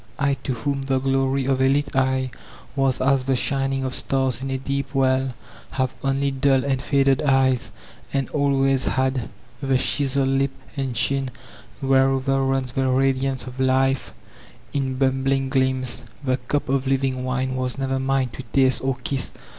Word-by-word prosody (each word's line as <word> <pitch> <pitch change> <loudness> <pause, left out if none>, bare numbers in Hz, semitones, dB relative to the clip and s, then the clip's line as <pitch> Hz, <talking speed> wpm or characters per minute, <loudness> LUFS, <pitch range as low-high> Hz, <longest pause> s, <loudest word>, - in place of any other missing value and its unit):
I, 140 0 +2
to 130 - 0
whom 140 +4 -2
the 135 -1 0
glory 135 0 +1
of 135 0 +1
a 130 - +4
lit 145 0 0
eye 130 -1 +1 0.4
was 135 -2 +1
as 135 0 +2
the 135 -1 +2
shining 135 0 +1
of 130 -1 -2
stars 130 -3 0
in 135 - -3
a 135 - -1
deep 140 +1 -3
well, 130 -1 +2 0.3
have 130 -1 -1
only 135 +1 +1
dun 135 0 +2
and 135 -2 0
faded 135 -1 +2
eyes, 135 -3 +2 0.4
and 135 -2 0
always 135 -2 +2
had; 130 -2 0 0.3
the 135 -2 +2
chiseled 135 0 +1
lip 135 0 +1 0.2
and 135 -3 -2
chin 135 +3 +1 0.5
whereover 135 0 +2
runs 135 -2 0
the 135 +1 0
radiance 135 0 +1
of 130 0 -9
life 130 0 +2 0.6
in 135 -2 -1
bub* 135 0 +1
bling 135 0 +1
gleams, 130 -3 0 0.2
the 130 -2 +1
cup 135 +3 -2
of 135 0 0
living 135 -1 0
wine 130 0 -1
was 130 0 -2
never 135 -1 -1
mine 135 -1 +1
to 130 - -8
taste 130 -2 +3
or 135 -1 0
kiss. 135 0 -1
135 Hz, 170 wpm, -23 LUFS, 130-135 Hz, 0.6 s, a